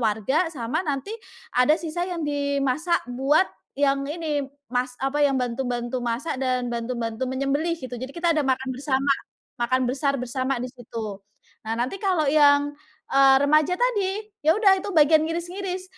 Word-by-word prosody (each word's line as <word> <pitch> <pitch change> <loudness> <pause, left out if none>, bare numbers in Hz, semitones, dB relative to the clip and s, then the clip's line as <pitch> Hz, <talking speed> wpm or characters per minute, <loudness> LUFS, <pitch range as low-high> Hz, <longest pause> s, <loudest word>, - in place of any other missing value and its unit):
warga, 230 - +1
sama 275 +2 -2
nanti 295 +5 -3 0.4
ada 250 +5 +4
sisa 335 +1 -3
yang 340 -3 -3
dimasak 285 +3 0
buat 270 +7 +3 0.3
yang 275 -1 +2
ini, 300 -3 -2 0.2
mas 250 0 -1
apa 270 +2 0
yang 275 -2 +2
bantu-bantu 245 0 -2
masak 255 +4 -2
dan 255 -1 0
bantu-bantu 235 +1 -3
menyembelih, 280 +5 0
gitu. 255 -2 -7
Jadi 260 +1 -5
kita 340 0 +2
ada - - +3
makan 260 -1 0
bersama. 275 +1 +1 0.5
Makan 255 +1 +2
besar 275 +2 0
bersama 260 +1 -2
di 245 - -3
situ. 225 -5 -7 0.5
Nah 225 - -1
nanti 255 +11 -2
kalau 370 -6 +1
yang, 285 0 +4 0.4
eee, 270 -1 +6
remaja 305 +4 +3
tadi, 420 -3 -1
ya 315 +5 +3
udah 390 -3 +4
itu - - -6
bagian 310 +1 +6
ngiris-ngiris. 365 +2 -4
275 Hz, 155 wpm, -24 LUFS, 255-320 Hz, 0.5 s, eee